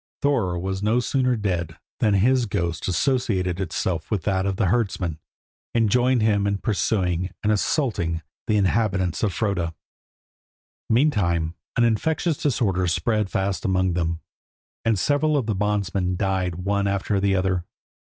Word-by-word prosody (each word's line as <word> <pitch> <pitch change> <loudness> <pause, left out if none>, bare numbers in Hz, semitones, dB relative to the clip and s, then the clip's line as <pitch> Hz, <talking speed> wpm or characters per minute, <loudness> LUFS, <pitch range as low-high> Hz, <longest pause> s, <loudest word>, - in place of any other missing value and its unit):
Thorer 115 -12 +1
was 95 +2 -3
no 110 +4 +2
sooner 125 0 +1
dead 90 -6 -2 0.2
than 105 -2 +3
his 120 +4 +3
ghost 85 -4 -2
associated 95 - 0
itself 85 -1 -2
to 105 - +1
that 95 +1 -1
of 95 - 0
the 100 - +1
herdsman, 95 -6 0 0.6
and 115 -3 +3
joined 125 -1 +3
him 100 -2 +2
in 100 0 0
pursuing 95 -4 0
and 105 - +2
assaulting 100 - 0 0.2
the 105 - +2
inhabitants 100 -3 +1
of 105 - +1
Froda. 90 -5 -1 1.1
Meantime 90 - +2 0.2
an 120 - +4
infectious 150 - +1
disorder 100 -10 0
spread 95 +5 0
fast 95 0 -1
among 95 -1 +1
them, 85 -1 -1 0.6
and 115 -2 +2
several 145 +7 +2
of 130 - 0
the 110 - 0
bondsmen 100 -2 0
died 95 -2 -1
one 100 +3 0
after 100 0 0
the 100 0 +2
other. 95 -2 0
100 Hz, 145 wpm, -24 LUFS, 90-110 Hz, 1.1 s, an